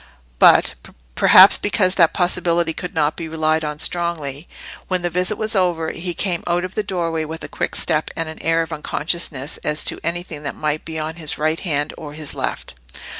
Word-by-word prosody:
But—perhaps - - +5
because 200 -3 +1
that 170 -4 +4
possibility 170 -2 +1
could 180 +2 -7
not 150 -1 +1
be 165 - -5
relied 160 0 0
on 150 -1 -3
strongly—when 170 +2 -3
the 175 - -1
visit 180 +4 0
was 215 0 -2
over, 175 -4 +1
he 175 0 -4
came 180 -4 -1
out 175 +1 +1
of 185 - -8
the - - 0
doorway 170 -5 -2
with 160 +1 -7
a - - -5
quick - - -3
step 155 - +1
and 165 - -2
an 160 - -8
air 165 0 +2
of 165 - -7
unconsciousness 150 -2 -2
as 150 0 -2
to - - -1
anything 170 -3 -3
that 145 - -5
might 155 0 -2
be 160 -1 -5
on 160 +1 -4
his 155 -3 -4
right 155 +1 0
hand 145 -4 -1
or 150 -2 -8
his 155 -1 -5
left. - - -4
165 Hz, 190 wpm, -20 LUFS, 155-175 Hz, -, But—perhaps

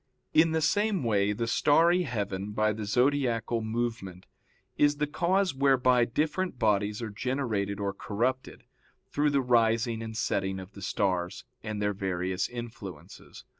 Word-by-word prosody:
In 160 +1 +5
the 160 0 +1
same 205 +1 +1
way 105 -3 +2
the 115 +3 -2
starry 165 +9 +4
heaven, 105 - -3
by 110 0 +1
the 105 0 -5
zodiacal 120 -1 +1
movement, 110 -5 -4 0.5
is 145 0 +3
the 150 - +1
cause 180 +4 +1
whereby 130 -3 +3
different 155 +6 -1
bodies 105 0 +1
are 110 - -4
generated 110 -4 -2
or 100 -1 -2
corrupted, 120 +7 -3 0.5
through 150 +1 +2
the 140 -1 +2
rising 115 -2 +2
and 110 -1 -6
setting 95 -4 -1
of 95 +1 -10
the 100 - -12
stars, 90 -1 -1 0.2
and 110 -1 -4
their 105 0 0
various 95 -1 -2
influences. 115 -9 -9
115 Hz, 145 wpm, -28 LUFS, 100-140 Hz, 0.5 s, In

